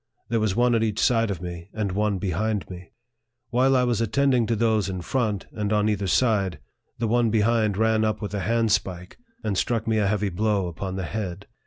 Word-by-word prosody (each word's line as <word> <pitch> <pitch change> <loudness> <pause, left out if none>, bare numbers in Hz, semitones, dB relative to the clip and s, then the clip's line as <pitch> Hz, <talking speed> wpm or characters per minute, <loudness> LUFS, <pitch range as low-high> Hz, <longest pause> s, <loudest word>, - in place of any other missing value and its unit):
There 115 -1 +1
was 110 -3 0
one 120 0 +3
at 115 - +2
each 110 -2 0
side 115 -2 +2
of 90 -3 -4
me, 85 0 -7
and 105 -3 -1
one 105 +1 0
behind 100 +3 -1
me. 90 0 -10 0.6
While 130 +2 +3
I 125 - +4
was 120 -2 +1
attending 125 +1 +2
to 115 - +1
those 110 -2 +1
in 95 -1 -4
front, 105 0 -1
and 105 -1 -3
on 105 0 +2
either 100 -2 -1
side, 100 -6 +2 0.4
the 115 - -1
one 120 +1 +2
behind 110 -1 +2
ran 110 0 +2
up 110 0 0
with 105 -2 -5
the 105 - -2
handspike, 105 -4 0 0.3
and 100 - -1
struck 115 +3 0
me 110 -1 +2
a 100 - +2
heavy 105 0 0
blow 100 +1 0
upon 95 +2 -5
the 95 -1 -3
head. 100 -1 -5
105 Hz, 210 wpm, -25 LUFS, 95-115 Hz, 0.6 s, I